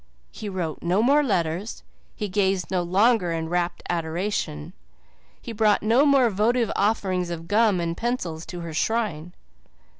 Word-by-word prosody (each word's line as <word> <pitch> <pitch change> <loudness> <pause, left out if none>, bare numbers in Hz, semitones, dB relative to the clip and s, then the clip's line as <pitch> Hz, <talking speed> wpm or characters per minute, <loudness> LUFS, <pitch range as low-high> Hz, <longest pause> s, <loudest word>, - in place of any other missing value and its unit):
He 210 - -7
wrote 175 -5 -4
no 180 +5 +1
more 285 +4 +4
letters, 185 - -2 0.3
he 210 - -3
gazed 190 -1 0
no 185 -1 +1
longer 190 +2 +2
in 160 -1 -3
rapt 175 0 -1
adoration, 165 - -3 0.7
he - - -8
brought 215 -2 +2
no 240 +7 +4
more 265 -5 +4
votive 225 +3 +1
offerings 190 -4 0
of 165 -1 -6
gum 210 -1 +3
and 170 -1 -2
pencils 180 -8 -3
to 175 -1 -7
her 165 -1 -6
shrine. 175 -4 -1
190 Hz, 150 wpm, -24 LUFS, 170-220 Hz, 0.7 s, more